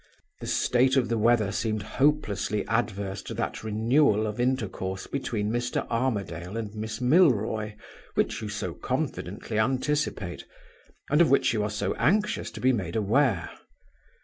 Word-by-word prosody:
"The - - -7
state 130 +2 +3
of 125 -3 +2
the 115 - +1
weather 110 -2 +3
seemed 110 0 -1
hopelessly 110 -5 0
adverse 100 -4 -1
to - - -7
that - - -3
renewal 110 +1 +3
of 105 +2 -4
intercourse 105 -7 -1
between 110 -6 -2
Mr. 120 +1 -1
Armadale 100 -6 -2
and 110 -2 -4
Miss 110 +2 -5
Milroy 115 - +3 0.4
which 110 +2 0
you 110 - -4
so 105 0 -3
confidently 110 - -3
anticipate, 130 - -1 0.7
and 150 +3 +5
of 170 - +5
which 140 - +3
you 110 - 0
are 105 - -1
so 105 -2 -1
anxious 210 - +1
to - - -9
be 130 +1 +3
made 90 -7 -3
aware. 110 - +2
110 Hz, 150 wpm, -27 LUFS, 105-130 Hz, 0.7 s, and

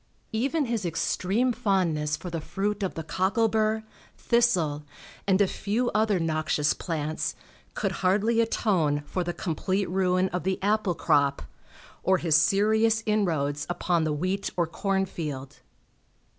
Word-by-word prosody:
Even 275 +7 0
his 230 -4 -2
extreme 190 +8 0
fondness 175 -9 0
for 180 - -7
the 165 -1 -3
fruit 205 +5 -2
of 190 - -2
the 160 - -4
cockle 190 +7 +1
bur, 220 0 +1 0.3
thistle, 180 -12 +1 0.4
and 190 -1 +3
a 200 - +4
few 225 +6 -1
other 215 -3 +2
noxious 155 -2 +1
plants, 155 -2 -3 0.4
could - - -1
hardly 210 +5 +3
atone 175 -10 +1
for 180 +4 -2
the 175 - -2
complete 185 +3 -2
ruin 185 0 +2
of 180 - -2
the 190 0 -1
apple 205 -3 +1
crop, 140 -4 +2 0.6
or 190 0 +3
his 165 -3 +2
serious 220 +7 +3
inroads 155 -9 0
upon 175 -1 0
the 155 - 0
wheat 185 +6 -1
or 170 - +3
corn 190 +3 -1
field. 145 -7 -6
185 Hz, 145 wpm, -27 LUFS, 160-215 Hz, 0.6 s, a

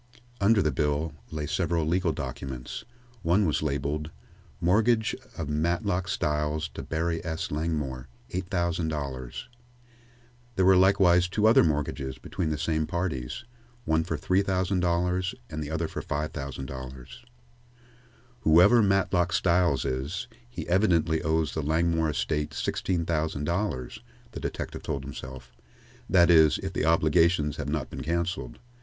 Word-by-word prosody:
Under 100 0 +4
the 75 - +1
bills 75 +3 0 0.2
lay 75 -1 -4
several 85 0 0
legal 85 +2 +1
documents. 70 - -6 0.4
One 90 +5 +3
was 80 - +1
labeled: 75 +1 -2 0.5
"Mortgage 110 +5 +2 0.2
of 80 - -3
Matlock 90 +5 0
Styles 75 -1 -1
to - - -7
Barry 85 +1 -2
S. 80 -1 -3
Langmore, 75 -5 -2 0.2
$8,000." 80 -8 -2 1.1
There 95 - +3
were 95 0 +7
likewise 90 -2 +5
two 105 +4 0
other 115 +5 +7
mortgages 70 -3 -1
between 80 +6 -3
the 75 - -1
same 80 0 0
parties, 85 - -3 0.4
one 80 0 +2
for 85 - -3
$3,000 90 -1 +1 0.2
and 75 0 -3
the 75 - -6
other 80 +1 -1
for - - -5
$5,000. 65 -3 -5 1.3
"Whoever 90 +9 +6
Matlock 95 -3 +2
Styles 85 -4 +2
is, 70 - -3 0.2
he - - -6
evidently 85 -4 +2
owes 80 -1 0
the 80 - -1
Langmore 80 +1 +1
estate 75 0 -2
sixteen 85 -3 -1
thousand 80 -3 -1
dollars," 85 - -2 0.3
the - - -6
detective - - -5
told 70 -3 -3
himself; 65 -2 -8 0.6
"that 85 -1 +6
is, 80 -2 +6
if - - -4
the - - 0
obligations 80 -1 +3
have 70 - -3
not 75 -3 -2
been - - -6
cancelled. 85 +3 -2
80 Hz, 130 wpm, -27 LUFS, 75-90 Hz, 1.3 s, were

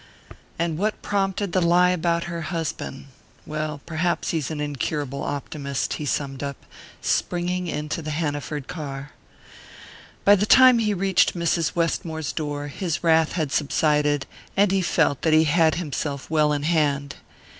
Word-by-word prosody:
"And 165 -1 -1
what 210 +2 -1
prompted 195 -1 -1
the 185 - +2
lie 175 +1 +4
about 170 -1 0
her 170 -1 -5
husband? 160 -4 -4 0.4
Well, 155 -1 -4
perhaps 170 +1 -1
he's 155 -5 -2
an 155 -2 -4
incurable 145 -1 -3
optimist," 140 -1 -3
he 150 - -3
summed 135 -1 -2
up, 140 -1 -4 0.5
springing 180 +1 0
into 150 0 -3
the 155 - -5
Hanaford 145 -2 -3
car. 140 -4 -6 1.1
By 205 - +8
the 205 +1 +2
time 255 -1 +7
he 210 -2 +1
reached 190 0 +2
Mrs. 170 -1 0
Westmore's 165 -2 -1
door 145 -2 -3
his 170 +3 -3
wrath 160 -1 +3
had 155 -5 -1
subsided, 150 -1 +1 0.3
and 200 -1 +4
he 195 -1 +2
felt 160 -5 +1
that 160 - +2
he 155 0 +6
had 160 0 +3
himself 145 -4 -4
well 150 -1 +3
in 145 -1 -1
hand. 145 -3 0
160 Hz, 150 wpm, -24 LUFS, 145-175 Hz, 1.1 s, By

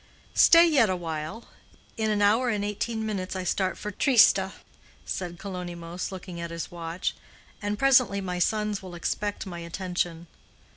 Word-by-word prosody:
"Stay 335 0 +7
yet 270 - +4
a 185 - +1
while. 165 +5 -5 0.5
In 220 -1 0
an 205 -1 +2
hour 225 +5 +4
and 205 -3 -1
eighteen 220 +2 -2
minutes 195 -3 -3
I 185 - -3
start 185 +1 0
for 210 - -5
Trieste," 220 -5 +5 0.6
said 175 -2 -4
Kalonymos, 175 -2 -6
looking 180 -2 -7
at 170 - -4
his 165 -1 -5
watch, 170 +1 -3 0.5
"and 205 0 -2
presently 255 -5 +4
my 180 -2 -3
sons 210 +2 0
will 185 -2 -9
expect 205 +4 -2
my 175 -3 -6
attention. 175 -1 -3
190 Hz, 155 wpm, -27 LUFS, 175-215 Hz, 0.6 s, Stay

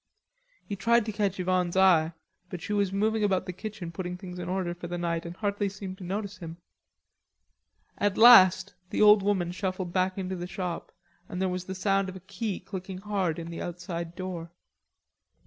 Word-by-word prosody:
He 205 - -4
tried 235 +3 +3
to 220 - -2
catch 200 -2 -1
Yvonne's 180 -1 0
eye, 170 -4 +5 0.4
but 180 - -5
she 210 - -4
was 200 -2 +1
moving 215 +2 +1
about 190 -2 +1
the 180 - -5
kitchen 200 -3 -6
putting 180 +1 -5
things 180 -1 -8
in 175 0 -5
order 185 -2 -1
for 175 0 -8
the 175 +1 -4
night, 170 -1 -2
and 170 - -7
hardly 205 -1 -1
seemed 190 -1 -8
to - - -8
notice 200 +1 -4
him. 165 -2 -8 1.4
At 205 -1 +1
last 220 -6 +8 0.2
the - - +2
old 210 -1 +8
woman 190 -3 0
shuffled 185 -1 -3
into 185 0 0
the 175 0 -5
shop 180 -2 -5 0.4
and 180 - -5
there 190 0 +1
was 180 0 -3
the 190 - -5
sound 195 0 +1
of 185 - -8
a - - -7
key 200 +2 -4
clicking 190 0 -7
hard 190 -4 -1
in 170 0 -6
the 165 - -6
outside 170 -1 -5
door. 180 -3 -5
185 Hz, 190 wpm, -28 LUFS, 175-200 Hz, 1.4 s, last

